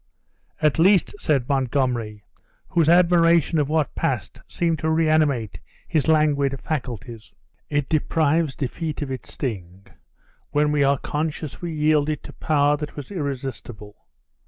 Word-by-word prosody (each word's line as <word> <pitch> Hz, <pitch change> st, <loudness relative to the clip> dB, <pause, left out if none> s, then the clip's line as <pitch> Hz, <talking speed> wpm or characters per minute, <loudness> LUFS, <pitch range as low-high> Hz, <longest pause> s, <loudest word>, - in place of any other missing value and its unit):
"At 150 Hz, 0 st, +3 dB
least," 190 Hz, +2 st, +4 dB
said 140 Hz, -7 st, 0 dB
Montgomery, 125 Hz, -6 st, -1 dB, 0.5 s
whose 165 Hz, -2 st, +2 dB
admiration 170 Hz, -2 st, +4 dB
of 145 Hz, -1 st, 0 dB
what 155 Hz, -3 st, 0 dB
passed -, -, -3 dB
seemed 165 Hz, -3 st, -1 dB
to 160 Hz, -, -1 dB
reanimate 155 Hz, -, +1 dB, 0.3 s
his 155 Hz, -2 st, 0 dB
languid 145 Hz, -3 st, +2 dB
faculties, 120 Hz, -6 st, -6 dB, 0.4 s
"it 145 Hz, -2 st, 0 dB
deprives 155 Hz, -1 st, +1 dB
defeat 150 Hz, +3 st, -4 dB
of 135 Hz, -, -6 dB
its 130 Hz, -, -6 dB
sting, 95 Hz, -7 st, -5 dB, 0.6 s
when 150 Hz, 0 st, +1 dB
we 145 Hz, -1 st, +2 dB
are 140 Hz, 0 st, +3 dB
conscious 150 Hz, +1 st, -4 dB
we 175 Hz, -1 st, -4 dB
yielded 150 Hz, -1 st, +1 dB
to -, -, -10 dB
power 145 Hz, -1 st, +2 dB
that 150 Hz, 0 st, -7 dB
was 145 Hz, +2 st, -8 dB
irresistible. 130 Hz, -, -5 dB
145 Hz, 135 wpm, -23 LUFS, 130-160 Hz, 0.6 s, least